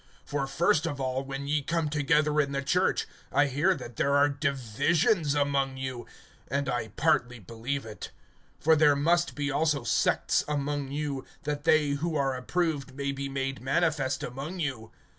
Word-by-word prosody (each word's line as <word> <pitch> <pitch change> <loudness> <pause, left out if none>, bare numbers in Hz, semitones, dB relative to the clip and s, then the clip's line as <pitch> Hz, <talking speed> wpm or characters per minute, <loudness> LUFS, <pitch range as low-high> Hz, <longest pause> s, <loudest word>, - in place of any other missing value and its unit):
(18)For 140 -2 -1
first 160 +1 +2
of 145 -4 -4
all, 130 0 -1
when 135 0 -5
ye 150 0 +1
come 165 +2 -1
together 150 0 +2
in 140 -1 -3
the 140 0 -1
church, 180 +7 +1 0.2
I 145 - +4
hear 145 +8 +2
that 120 -8 -9
there 140 0 +2
are 145 +1 +5
divisions 145 - +1
among 140 -2 +1
you; 130 -2 -5 0.4
and 140 +1 -1
I 120 -3 -1
partly 125 - +1
believe 115 +6 -4
it. 110 -1 -8 0.5
(19)For 160 -1 +5
there 150 -2 +6
must 170 +4 +2
be 145 -1 -1
also 150 -2 +1
sects 115 - +2
among 145 -1 -2
you, 145 -2 -3 0.2
that 150 -1 -3
they 155 -2 +4
who 155 +3 -1
are 135 -2 +1
approved 145 0 -2
may 140 0 -2
be 140 0 -4
made 135 -2 -3
manifest 140 -1 0
among 140 +9 -5
you. 130 -8 -3
140 Hz, 170 wpm, -28 LUFS, 135-150 Hz, 0.5 s, there